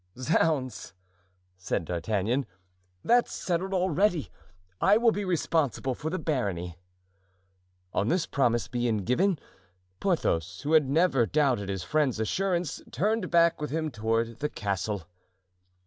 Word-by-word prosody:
"Zounds!" 130 - 0 0.6
said 90 -2 -2
D'Artagnan, 105 - -1 0.6
"that's 240 +1 +3
settled 185 +2 -2
already; 185 -2 +1 0.5
I 210 - +5
will 230 0 +4
be 205 -1 -2
responsible 160 - 0
for 150 +5 -4
the 185 - -2
barony." 95 - -2 1.1
On 100 - 0
this 170 +5 +1
promise 120 -4 +1
being 120 -4 -1
given, 175 - +2 0.6
Porthos, 90 - 0
who 150 +2 -1
had 150 -4 +5
never 140 -6 +3
doubted 130 -10 +1
his 95 -2 -3
friend's 145 -4 +1
assurance, 175 - -1
turned 205 - 0
back 170 -2 +3
with 150 - -2
him 155 +1 -2
toward 115 0 -1
the 150 - -1
castle. 100 - -3
140 Hz, 125 wpm, -28 LUFS, 110-170 Hz, 1.1 s, I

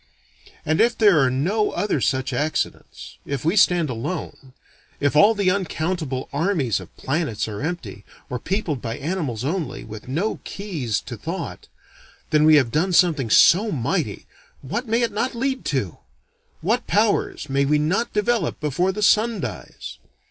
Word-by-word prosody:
And 155 +2 +2
if 235 +1 +3
there 205 -7 +5
are 135 -2 +4
no 180 - 0
other 200 -9 -1
such 130 +2 0
accidents, 150 +5 -3
if 140 0 -4
we 165 +5 +2
stand 175 -5 +4
alone, 130 +1 -5 0.5
if 145 0 +1
all 205 +9 +6
the 200 -3 +2
uncountable 165 -7 -2
armies 145 - 0
of 90 - -13
planets 135 -8 -2
are 105 +1 -6
empty, 140 - -5 0.2
or 125 - -4
peopled 170 - -2
by 115 -1 -4
animals 140 - -3
only, 160 -3 -3
with 110 0 -10
no 170 +12 -1
keys 160 - -3
to - - -7
thought, - - -6 0.6
then 150 0 +4
we 155 0 +7
have 130 -6 +3
done 175 +7 +1
something 160 -9 +3
so 205 - +5
mighty, 140 - -2 0.4
what 235 - -3
may 230 +2 +1
it 230 - 0
not 230 +5 -2
lead 260 +2 -1
to! 120 - -2 0.6
What 225 +9 0
powers 210 -6 +1
may 140 0 +1
we 150 +2 +3
not 185 +11 0
develop 210 -4 0
before 155 +6 0
the 210 +2 -3
Sun 215 +1 +3
dies! 95 - -7
155 Hz, 160 wpm, -22 LUFS, 130-200 Hz, 0.6 s, we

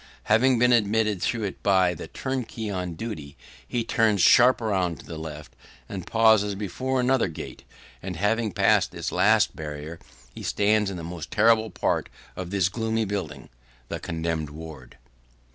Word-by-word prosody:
Having 125 +4 +3
been 125 +1 +4
admitted 110 -3 +2
through 115 -2 -1
it 100 - -5
by 95 -3 +3
the 85 - -8
turnkey 120 -5 -4
on 90 -3 -4
duty, 80 -10 -7 0.3
he 120 -1 -1
turns 110 -3 +2
sharp 125 +7 +6
round 95 - -1
to - - -13
the - - -8
left, 75 -1 -8 0.3
and 95 -3 -7
pauses 110 -3 +4
before 125 +7 -2
another 130 -2 +2
gate; 80 - -8 0.4
and, 95 -1 -5
having 105 +4 0
passed - - +3
this - - -4
last 105 +2 +3
barrier, 75 +1 -7 0.3
he - - -9
stands 105 0 +1
in 95 - -5
the 85 - -7
most 85 -2 -7
terrible 110 0 +3
part - - -1 0.3
of 90 -1 -6
this 95 -2 +2
gloomy 110 +2 -1
building 100 -1 -5 0.4
the - - -4
condemned 80 -2 -3
ward. 75 -5 -11
100 Hz, 160 wpm, -25 LUFS, 85-110 Hz, 0.4 s, sharp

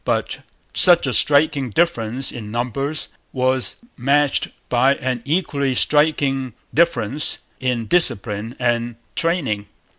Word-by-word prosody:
But - - -2 0.3
such 175 -3 +5
a 130 - -1
striking 145 +1 +4
difference 130 -4 0
in 110 -4 -8
numbers 125 +6 -3 0.2
was 130 -4 0 0.2
matched 140 +3 +1 0.2
by 130 +3 +2
an 130 -3 -3
equally 140 -4 -1
striking 140 -4 +2 0.2
difference 150 -4 +1 0.2
in 125 -3 -2
discipline 110 - +1
and 120 -1 -1 0.2
training. 140 - -1
130 Hz, 110 wpm, -20 LUFS, 120-145 Hz, 0.3 s, such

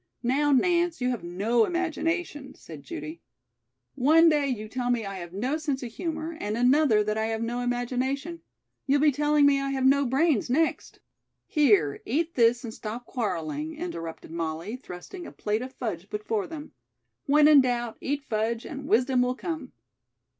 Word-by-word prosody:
"Now, 285 +4 +2
Nance, 345 +4 +2
you 250 0 0
have 235 -8 -4
no 205 +7 +1
imagination," 330 -4 -2
said 155 -3 -11
Judy. 150 +4 -7 0.7
"One 315 +5 +5
day 295 -2 +2
you 220 -5 -3
tell 245 +2 -3
me 240 -3 0
I 195 -1 -5
have 175 -1 -8
no 250 - -1
sense 290 -4 -3
of 235 - -6
humor, 320 +3 -4
and 210 +2 -2
another 250 -3 +4
that 215 +1 -1
I 220 - 0
have 225 0 -2
no 240 +1 -2
imagination. 255 +6 -2 0.5
You'll 280 +1 +3
be 300 -1 +5
telling 295 +1 +3
me 280 -1 +4
I 275 - -2
have 265 -1 -1
no 275 0 +4
brains 270 -2 +2
next." 315 +6 0 0.4
"Here, 205 - +3
eat 320 +7 -1
this 240 +1 +3
and 225 -2 -6
stop 230 +3 -6
quarreling," 230 - -3
interrupted 165 - -6
Molly, 165 +5 -4
thrusting 255 - -9
a - - -9
plate 210 +2 -2
of 255 +1 -6
fudge 205 -8 -5
before 210 0 -2
them. 310 -2 -8 0.6
"When 295 +1 +6
in 300 -2 +8
doubt, 240 -2 -2
eat 285 +1 -2
fudge 225 -1 -2
and 280 -2 -7
wisdom 250 +3 +3
will 250 0 +1
come." 315 -3 -5
255 Hz, 175 wpm, -27 LUFS, 220-295 Hz, 0.7 s, in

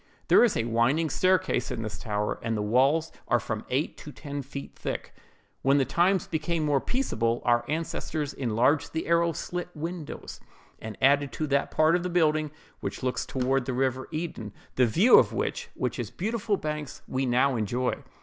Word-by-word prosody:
There - - +7
is 240 - +3
a - - +1
winding 120 +8 +1
staircase 185 -9 +2
in 115 - -4
this 110 -1 -5
tower, 105 -1 -2
and 115 -1 -1
the 105 - -1
walls 135 +9 +2 0.2
are - - +3
from - - -4
eight - - -1
to - - -9
ten 145 0 -6
feet 140 +1 -8
thick. - - -5 0.5
"When 135 +1 +4
the 135 - +3
times 175 +7 +2
became 160 0 -1
more 145 -3 +2
peaceable, 120 - 0
our 120 -1 +3
ancestors 155 -1 -2
enlarged 130 +4 +1
the 160 - -2
arrow 170 0 +3
slit 175 +2 -4
windows, 165 0 -6 0.4
and 110 -1 -7
added 140 +1 +4
to 155 - -2
that 140 -1 +1
part 155 +2 +3
of 175 - +1
the 180 - -3
building 155 -3 +2 0.3
which - - -5
looks 125 -1 -1
toward 130 0 0
the 130 - -2
river 130 0 0
Eden; 155 - -5 0.2
the 125 -1 +3
view 190 - +7
of - - +1
which, - - -2
with - - -2
its - - -3
beautiful 215 +1 -1
banks, 150 -3 -5
we 130 0 -1
now 130 +2 +3
enjoy. 120 +3 -1
140 Hz, 185 wpm, -27 LUFS, 125-165 Hz, 0.5 s, There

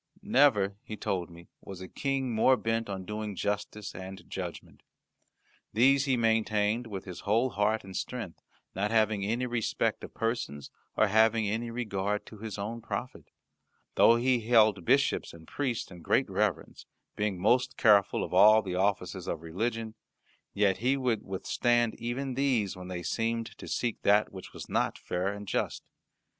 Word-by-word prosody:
Never, 120 - +3
he 110 - -8
told 90 -3 -2
me, 85 0 -14
was 95 -2 -9
a 95 - -7
King 135 0 -2
more 130 +4 +4
bent 115 -1 -1
on 95 -2 -5
doing 105 0 -4
justice 105 +1 -3
and 95 +1 -9
judgment. - - -7 0.9
These 135 +5 +4
he 130 -3 +2
maintained 110 0 +1
with 100 -4 -6
his 90 -3 -8
whole 115 +5 +1
heart 105 +2 +1
and 95 -1 -10
strength, 115 -9 -5 0.3
not 100 +3 -1
having 110 -2 +2
any 115 +5 -1
respect 120 -3 -1
of - - -10
persons, 115 - -3 0.3
or - - +5
having 110 +1 +2
regard 105 -3 -2
to 110 - -12
his 110 -1 -6
own 110 +4 -4
profit. 120 +2 -5 0.7
Though 115 - +6
he 125 +1 +2
held 110 -4 +4
bishops - - +2
and 80 -1 -14
priests 125 -9 -3
in 90 -1 -11
great 130 - +2
reverence, 100 -3 -2 0.3
being 105 -3 -1
most 125 +6 +2
careful 105 -3 +4
of - - -6
all 110 +1 +7
the 95 -2 -4
offices 95 -1 -1
of 85 -1 -3
religion, 110 +6 -3 0.6
yet 100 -2 +2
he 130 +6 +1
would 125 -5 0
withstand 120 +4 0
even 130 +3 -3
these 125 -7 +1
when 90 0 -9
they 90 -1 -5
seemed 115 +5 -2
to - - -9
seek 120 -2 -2
that 105 +1 +3
which 95 - -9
was - - -9
not - - 0
fair 90 +2 -3
and 100 0 -8
just. - - -2
110 Hz, 165 wpm, -29 LUFS, 100-120 Hz, 0.9 s, all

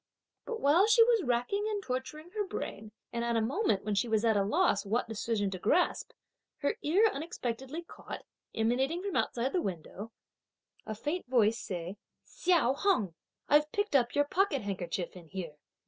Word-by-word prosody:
But 460 -2 -4
while 325 +9 +5
she 455 +1 +7
was 460 -2 +3
racking 250 - 0
and 410 -2 -2
torturing 260 +6 -5
her 420 +1 -1
brain 215 - -6 0.2
and 235 0 -1
at 235 0 0
a - - +3
moment 225 - 0
when 210 - 0
she 200 +4 +1
was 220 0 +1
at 225 -1 +4
a 200 - +3
loss 210 - +2
what 225 +5 0
decision 220 -2 -1
to 185 - -5
grasp, 340 - +1 0.5
her 285 - 0
ear 375 +9 +4
unexpectedly 275 0 -4
caught, - - -9 0.3
emanating 265 +10 +1
from 400 -2 -3
outside 250 +3 0
the 360 - +2
window, 195 - -5 0.8
a 215 - -3
faint 300 - -3
voice 230 -3 +3
say: 180 -1 -5 0.3
"Hsiao 335 -8 +2
Hung, 275 - +1 0.3
I've 300 +1 +4
picked 410 -6 -1
up 245 -3 +3
your 290 0 +4
pocket 320 - +1
handkerchief 185 -3 -3
in 175 -3 -12
here!" 170 -4 -6
250 Hz, 175 wpm, -31 LUFS, 210-345 Hz, 0.8 s, she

